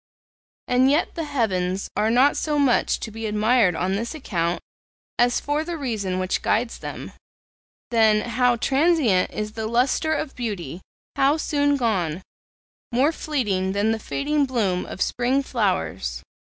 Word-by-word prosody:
And 255 +2 +4
yet 295 +4 +1
the 330 - -4
heavens 195 -9 -1
are 210 +2 +2
not 255 +5 +4
so 300 -1 -1
much 275 -4 +2
to 220 - -5
be 225 +1 -5
admired 210 -2 +3
on 185 +3 -1
this 230 +8 -3
account 175 - -2 0.6
as 245 0 +3
for 295 +2 -1
the 340 +1 -4
reason 215 -10 -2
which 185 0 -1
guides 230 +1 0
them. - - -7 0.8
Then, 220 -2 +4
how 245 +1 +2
transient 270 - +2
is 210 0 -4
the 220 0 -4
lustre 255 +7 +1
of 300 -2 -4
beauty! 190 - -5 0.4
how 280 +3 +3
soon 285 -2 +1
gone! 185 - -1 0.7
more 260 +6 +3
fleeting 210 - -1
than 205 +2 +1
the 225 - -1
fading 285 +4 -1
bloom 205 -8 -1
of - - -2
spring 255 +3 0
flowers. 180 - -2
230 Hz, 150 wpm, -23 LUFS, 195-275 Hz, 0.8 s, And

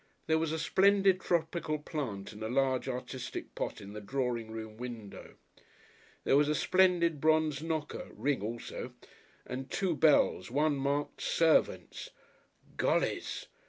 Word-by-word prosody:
There 160 0 +2
was 160 -1 -1
a 160 - -1
splendid 195 +3 +4
tropical 160 -2 0
plant 135 -10 -5
in 105 - -11
a 110 - -2
large, 130 0 +1
artistic 125 0 -5
pot - - -4
in 100 +1 -10
the 105 - -6
drawing 120 0 -2
room 110 -1 -7
window. 115 -4 -8 0.9
There - - +3
was 145 +1 +4
a 150 - +2
splendid 175 -5 +3
bronzed 155 -2 +2
knocker 160 -2 -3
(ring 140 -4 0
also) 115 +3 -5 0.5
and 130 +1 -5
two 185 -4 0
bells 145 - +3
one 145 +4 +2
marked 140 +1 -1
"servants." 165 -1 +1 0.7
Gollys! - - 0
145 Hz, 135 wpm, -31 LUFS, 125-160 Hz, 0.9 s, splendid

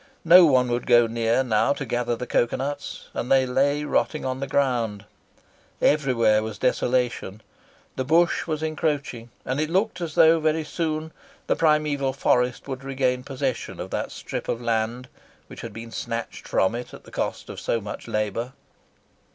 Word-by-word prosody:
No 175 +2 +9
one 125 -3 +3
would 120 0 -2
go 120 -2 +6
near 115 +2 +1
now 120 +3 +2
to 140 - -5
gather 120 -1 -1
the 125 - -5
cocoa 120 0 +1
nuts, 145 +2 -5
and 125 - -4
they 135 -1 +5
lay 140 +3 +1
rotting 150 0 0
on 130 0 -2
the 140 - -3
ground. 120 -7 0 0.7
Everywhere 120 -7 +3
was 110 -1 -5
desolation. 120 -4 0 0.5
The 130 - 0
bush 170 +6 +2
was 155 -1 -2
encroaching, 145 -6 -2 0.2
and 130 +4 -1
it 155 - -1
looked 190 +1 0
as 165 -2 -4
though 160 +1 +6
very 155 0 +1
soon 155 0 -3 0.3
the - - +1
primeval 150 -4 +2
forest 125 -2 +1
would 135 -1 -5
regain 130 -2 0
possession 135 -2 -3
of - - -6
that - - -2
strip - - -6
of 115 - -1
land 115 +1 -1 0.4
which - - -11
had 115 - -7
been 115 +2 -9
snatched 115 0 -5
from 95 - +2
it 120 +1 -6
at - - -14
the - - -15
cost - - -3
of - - -7
so 115 - -1
much 105 -1 -8
labour. 110 +4 -2
130 Hz, 175 wpm, -24 LUFS, 120-150 Hz, 0.7 s, No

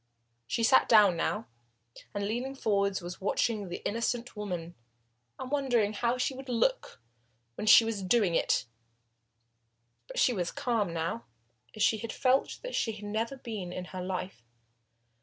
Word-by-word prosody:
She 230 - -1
had - - +5
sat 260 - +5
down 210 -5 +7
now, 210 +6 -1 0.7
and 200 -1 -2
leaning 250 +5 -3
forwards, 200 -6 0
was 175 +1 -7
watching 205 0 0
the 175 - -4
innocent 235 +2 -2
woman 180 -5 -5 0.6
and 255 - -7
wondering 245 -7 +1
how 235 +3 0
she 255 +2 0
would 265 0 -9
look - - 0 0.5
when 210 - -5
she 225 - +9
was 225 -3 -2
doing 195 -1 +2
it. 145 - +1 1.4
But - - -9
she 250 - +4
was 175 -5 -1
calm 230 -9 -1
now, 165 +7 -3 0.5
as 215 - 0
she 220 - +3
felt 255 +4 0
that - - -5
she 225 - 0
had 210 0 -9
never 225 +6 -2
been 215 -8 -6
in 180 0 -5
her 185 - -4
life. 185 -7 -4
215 Hz, 160 wpm, -30 LUFS, 190-240 Hz, 1.4 s, she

